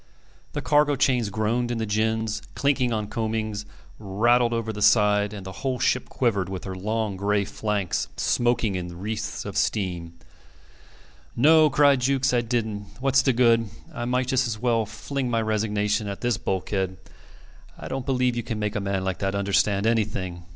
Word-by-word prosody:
The - - -3
cargo 145 -1 +3
chains 125 -5 +2
groaned 110 +4 0
in 120 - -2
the 110 - -1
gins, 110 +1 0
clinked 140 -3 +1
on 110 -2 -1
coamings, 110 -1 -3 0.3
rattled 120 +4 +2
over 115 -1 -2
the 105 - -6
side; 105 -1 +4
and 100 -3 -8
the 95 - -6
whole 130 -2 -1
ship 125 +1 0
quivered, 100 -7 0
with 95 -1 -5
her 95 - -5
long 105 +2 -2
gray 100 +1 0
flanks 105 -3 -2
smoking 120 -3 +1
in 90 -2 -5
wreaths 105 +3 -4
of - - -6
steam. 90 -5 -1 1.2
"No," 155 +4 +6
cried 140 -1 +4
Jukes, 130 0 +2
"I 120 - +3
didn't. 110 -4 -2
What's 135 0 +3
the 135 - +2
good? 115 -2 +3 0.2
I 120 - -4
might 125 +1 +1
just 130 0 +1
as 110 -2 -3
well 115 -1 +1
fling 130 +4 -4
my 115 -1 +1
resignation 105 -1 0
at 100 -1 -5
this 120 -1 +1
bulkhead. 95 0 -2 0.8
I - - -8
don't 135 -1 -3
believe 125 -2 +1
you 120 - -1
can 115 -1 -4
make 105 +1 -2
a - - +1
man 100 -1 -1
like 95 -1 -2
that 95 0 -1
understand 100 +1 +1
anything. 95 -6 -1
110 Hz, 175 wpm, -25 LUFS, 100-120 Hz, 1.2 s, No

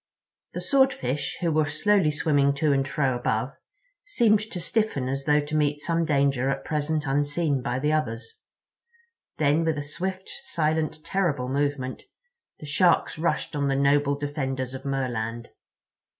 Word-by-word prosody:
The - - -4
Swordfish, 260 - +1
who 170 -2 +1
were 155 -1 +2
slowly 160 +3 +2
swimming 145 -2 +2
to 145 +1 +2
and 135 -1 +1
fro 135 -1 0
above, 120 +2 -1 0.5
seemed 235 - +3
to 215 -3 -6
stiffen 210 - -1
as 135 +1 -3
though 150 0 +4
to 150 +1 -5
meet 150 -1 +1
some 165 +2 0
danger 140 -3 +2
at 135 - -3
present 150 0 -1
unseen 145 +1 0
by 125 0 -2
the 150 +3 0
others. 115 -7 -3 1.0
Then, 150 +2 +2
with 160 -2 0
a 145 - -3
swift, 185 +6 -5
silent, 155 - -1
terrible 150 -10 0
movement, 140 -1 -1 0.6
the - - -9
Sharks 155 +2 +2
rushed 160 -1 -1
on 140 -1 0
the 135 - +1
noble 140 +1 +3
defenders 135 -3 -3
of 135 +1 -8
Merland. 120 -4 -3
145 Hz, 150 wpm, -26 LUFS, 135-160 Hz, 1.0 s, though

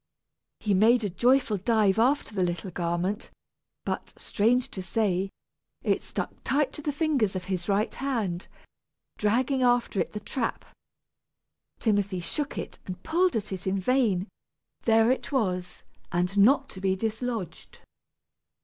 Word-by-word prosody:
He 210 - 0
made 225 +5 +5
a 205 - -1
joyful 245 +2 +3
dive 215 0 +2
after 255 0 +2
the 195 - -1
little 175 +1 -1
garment, 175 +4 -2 0.6
but, - - -4
strange 240 +4 +1
to 190 - -5
say, 190 0 0 0.5
it - - +1
stuck - - -4
tight 285 0 +1
to - - -7
the 295 - -1
fingers 280 - +1
of 185 - -3
his 185 0 -3
right 205 +2 +1
hand, 220 -10 -2 0.7
dragging 255 +5 +2
after 245 -4 +2
it - - -1
the 210 - -3
trap. 230 +3 -3 1.1
Timothy 200 -4 +1
shook 280 - -3
it - - -6
and 185 0 -6
pulled 355 +3 +2
at 210 -2 -2
it 190 0 -5
in 195 +1 +1
vain; 210 -4 +2 0.6
there 225 +1 +5
it 260 - -2
was, 185 -9 -1 0.3
and 180 +2 0
not 265 +7 +5
to 190 - -10
be 190 -1 +2
dislodged. 225 -2 -4
210 Hz, 145 wpm, -27 LUFS, 190-250 Hz, 1.1 s, made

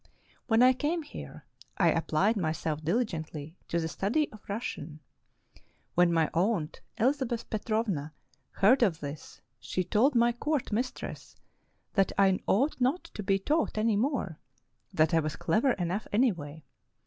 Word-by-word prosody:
When 225 0 +5
I 255 +1 +7
came 310 +6 -1
here, 290 - -10 0.3
I 170 -3 +4
applied 165 +7 +1
my 160 -6 0
self 155 -1 -3
diligently 160 -5 -2
to 170 - 0
the 160 - -1
study 225 - 0
of 215 - -13
Russian. 160 -8 -5 0.9
When 175 0 +4
my 165 -2 +3
aunt, 170 -3 0 0.2
Elizabeth 245 -1 0
Petrovna, 215 -8 -1 0.4
heard 250 +7 +4
of 185 -9 +2
this, 145 +1 -8 0.2
she 185 - -2
told 235 - +2
my 235 0 +4
court 280 +2 -2
mistress 245 +5 -4 0.6
that 195 -2 +2
I 195 -1 +4
ought 260 +6 +1
not 270 +9 +2
to - - -5
be 195 -1 +2
taught 300 +6 0
any 215 0 +2
more, 220 - -1 0.3
— - - -46
that 155 +1 +4
I 165 - +5
was 155 -1 -2
clever 240 +4 +2
enough 180 +3 -2
anyway. 170 - 0
205 Hz, 150 wpm, -29 LUFS, 165-245 Hz, 0.9 s, I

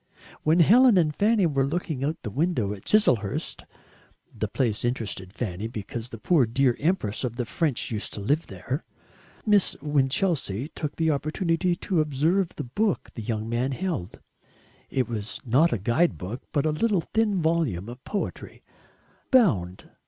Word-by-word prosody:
When 160 +3 +4
Helen 235 - +6
and 155 -4 +2
Fanny 210 -1 +3
were 140 -4 +2
looking 150 -1 -2
out 150 +3 0
of - - -42
the 105 - -4
window 130 - 0
at 100 - -11
Chiselhurst 125 - +1 0.7
the - - -2
place 115 -5 0
interested 110 -6 -3
Fanny 105 -2 -4
because 115 +1 -6
the 115 - -8
poor 130 - +3
dear 125 +1 +2
Empress 145 - 0
of 120 -2 -2
the 125 -1 -2
French 140 0 -1
used 105 -2 -3
to - - -3
live 145 +11 0
there 135 +5 -4 0.6
Miss 205 -3 +3
Winchelsea 145 - 0
took 150 -2 -5
the 160 -1 +2
opportunity 165 +4 0
to 175 -2 0
observe 160 +6 +1
the - - -4
book 200 - -1
the 115 - -6
young 110 0 -3
man 120 +4 -1
held. 170 - -4 0.7
It 130 -2 0
was 110 -2 -5
not 140 +8 +4
a - - +1
guide 120 - +1
book, 105 +8 -6
but 145 0 +1
a 155 - +2
little 200 +3 +1
thin 220 -4 +2
volume 160 - 0
of 125 +2 -9
poetry 205 - -5 0.7
BOUND. 95 - +2
140 Hz, 165 wpm, -26 LUFS, 115-170 Hz, 0.7 s, Helen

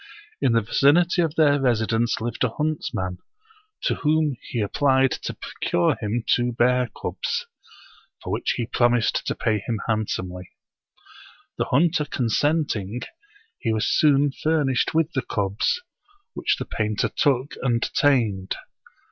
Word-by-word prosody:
In 125 - +3
the 115 - +4
vicinity 170 - +3
of 160 -2 -1
their 145 -3 +4
residence 115 -2 +1
lived 115 +2 -3
a 125 - +2
huntsman, 115 -10 -3 0.6
to - - +2
whom 155 -2 +1
he 120 - -2
applied 130 +4 +2
to - - -4
procure 85 -1 0
him 110 +2 -2
two 120 0 +2
bear 125 +1 +2
cubs, 485 +1 -3 0.8
for - - -3
which - - 0
he 120 - -1
promised 120 -1 +2
to - - -1
pay 110 -1 0
him 110 +1 -3
handsomely. 90 -5 -2 1.1
The - - +1
hunter 150 +2 +2
consent 145 +5 0
ing, 105 +4 -5 0.6
he 115 - -1
was 110 -1 0
soon 145 -1 +3
furnished 150 -2 0
with 165 0 +2
the 130 - 0
cubs, 100 - -1 0.5
which - - 0
the - - -4
painter 105 -1 -1
took 135 -1 +1
and 120 -3 +1
tamed. 110 -10 +2
125 Hz, 140 wpm, -24 LUFS, 110-145 Hz, 1.1 s, the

